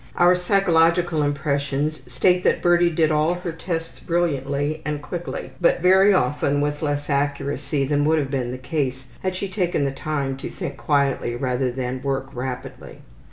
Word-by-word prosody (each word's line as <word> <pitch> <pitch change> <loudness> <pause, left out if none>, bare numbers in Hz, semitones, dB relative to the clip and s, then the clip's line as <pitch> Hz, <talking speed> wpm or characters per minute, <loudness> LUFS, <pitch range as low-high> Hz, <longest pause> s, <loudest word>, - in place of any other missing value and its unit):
Our 175 +1 +5
psychological 175 -3 +2
impressions 145 +1 -1
state 180 +8 +2
that - - +2
Birdie 175 0 +4
did 160 -1 +2
all 155 +3 +2
her 180 -1 -4
tests 165 0 -5
brilliantly 145 -3 -1
and 150 0 -2
quickly, 170 +4 -6
but 170 - +3
very 190 +3 +6
often 145 -6 +1
with 145 0 -1
less 145 -1 -1
accuracy 140 0 -1
than 145 +1 +1
would 160 +1 +3
have 140 -3 -1
been 130 -3 -1
the 130 - -5
case 130 -1 -2 0.2
had 185 -1 -2
she 200 +2 -3
taken 180 -6 0
the 135 - 0
time 135 -1 -3
to - - -6
think - - -6
quietly 140 -5 0
rather 125 +1 -1
than 130 0 -4
work 135 0 -2
rapidly. 125 0 -6
145 Hz, 165 wpm, -23 LUFS, 135-170 Hz, 0.2 s, very